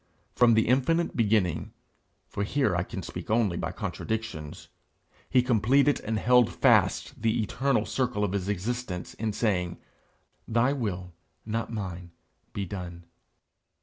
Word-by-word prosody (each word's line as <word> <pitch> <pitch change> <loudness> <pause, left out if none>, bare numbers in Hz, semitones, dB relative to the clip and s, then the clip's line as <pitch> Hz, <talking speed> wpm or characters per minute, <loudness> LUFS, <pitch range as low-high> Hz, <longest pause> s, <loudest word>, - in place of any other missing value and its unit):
From 120 -2 +5
the 110 - +3
infinite 135 +7 +2
beginning 100 -7 +1 0.5
for - - -5
here 120 -3 +1
I 85 - +1
can - - -6
speak - - -7
only 110 -5 +2
by - - -3
contradictions 110 -10 -5 0.6
he 125 -1 +4
completed 125 +4 +3
and 110 0 -2
held 125 +1 +4
fast - - +2
the 115 +1 +1
eternal 125 0 0
circle 125 -5 -1
of 100 - 0
his 100 -1 -2
existence 105 -1 -3
in 110 0 -2
saying, 90 -5 -1 0.7
'Thy 120 +4 +2
will, 95 -9 -4 0.3
not 115 +2 -3
mine, 90 -5 -5 0.4
be 100 - -3
done!' 90 -2 -7
110 Hz, 135 wpm, -27 LUFS, 95-120 Hz, 0.7 s, From